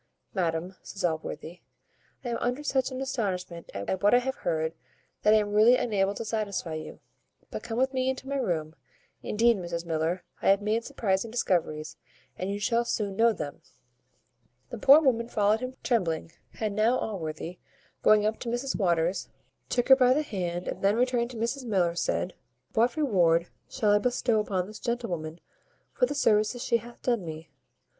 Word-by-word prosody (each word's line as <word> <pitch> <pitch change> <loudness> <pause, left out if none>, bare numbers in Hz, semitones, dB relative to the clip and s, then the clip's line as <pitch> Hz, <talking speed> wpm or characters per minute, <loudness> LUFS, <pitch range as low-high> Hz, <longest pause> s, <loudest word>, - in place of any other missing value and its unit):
"Madam," 175 0 -1
says 190 -2 -4
Allworthy, 160 +1 -4 0.6
"I - - -2
am 235 - -1
under 250 +4 -2
such 265 -3 +1
an 260 0 -5
astonishment 185 -10 -3
at 100 - -2
what 205 +4 +5
I - - +7
have 260 +2 -1
heard, 160 -1 -1 0.5
that 210 - +4
I 220 - +7
am 205 -1 0
really 220 +4 +7
unable 200 -3 0
to 230 - -5
satisfy 205 -6 -2
you; 155 0 -7 0.5
but - - -4
come 225 -1 -5
with 265 +2 +1
me 260 0 +1
into 265 0 -4
my 280 0 -1
room. 160 - -1 0.5
Indeed, 230 +1 +3
Mrs 170 -2 -4
Miller, 165 +2 -1 0.2
I - - +3
have 195 0 +5
made 215 +3 0
surprizing 220 -6 -1
discoveries, 160 -8 -1 0.4
and 185 - -4
you 200 +1 -2
shall 230 +3 +1
soon 205 -4 -2
know 230 +3 +5
them." 145 -9 -6 1.1
The - - -6
poor 280 +7 +8
woman 235 -5 +2
followed 210 -1 +2
him 255 +1 -5
trembling; 165 - 0 0.3
and 215 -2 -1
now 225 +4 +3
Allworthy, 175 -4 -5 0.4
going 210 -1 +5
up 220 +1 0
to 235 - -4
Mrs 240 +3 -2
Waters, 175 -2 +1 0.4
took 245 +1 0
her 265 - +11
by 255 -1 +4
the 305 - +1
hand, 180 - -3
and - - -4
then, 215 +5 +4
turning 245 -2 0
to 245 -1 -9
Mrs 235 +4 -2
Miller, 185 -6 +1
said, 175 +1 -1 0.4
"What 240 +5 +2
reward 175 - +3 0.2
shall 215 -6 +1
I 205 - +5
bestow 245 -1 +1
upon 190 -4 -1
this 215 +2 -10
gentlewoman, 175 -10 -3 0.5
for 250 - +2
the 290 - -4
services 215 -2 +2
she 235 - +2
hath 235 +1 -13
done 235 -6 +1
me? 160 -1 -8
210 Hz, 180 wpm, -28 LUFS, 175-240 Hz, 1.1 s, her